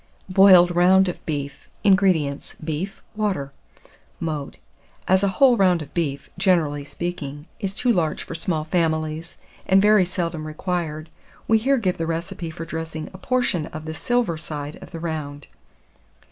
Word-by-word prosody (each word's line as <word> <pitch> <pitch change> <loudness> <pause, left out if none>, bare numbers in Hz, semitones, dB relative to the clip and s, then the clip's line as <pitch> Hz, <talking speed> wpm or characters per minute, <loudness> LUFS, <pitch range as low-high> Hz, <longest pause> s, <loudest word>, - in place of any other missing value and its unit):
BOILED 185 -2 +7
ROUND 185 +2 +5
OF 175 - -7
BEEF. 140 -3 -4
608. 205 - +4
INGREDIENTS. 175 -8 +1
Beef, 160 +5 -4
water. 195 -10 -1 0.7
Mode. 155 -4 -4 0.5
As 190 +1 +4
a 200 - +2
whole 260 -3 +6
round 180 -5 +3
of 145 - -15
beef, 140 -5 -2
generally 165 -7 +2
speaking, 150 -2 -5
is 195 -3 -3
too 250 +2 +2
large 165 -5 0
for - - -8
small 165 -1 -1
families, 160 0 -1 0.3
and 190 0 +5
very 210 -1 +5
seldom 170 -3 -3
required, 155 -1 -3 0.4
we 225 0 +4
here 270 +5 +2
give 185 -8 -1
the 165 - -1
recipe 165 +1 -4
for 160 +1 -7
dressing 160 -1 -5
a 185 - -10
portion 240 -9 0
of 155 0 -8
the 160 - -4
silver 230 -2 0
side 150 -1 -6
of - - -11
the 165 - -7
round. 150 -3 -5
170 Hz, 160 wpm, -23 LUFS, 155-190 Hz, 0.7 s, BOILED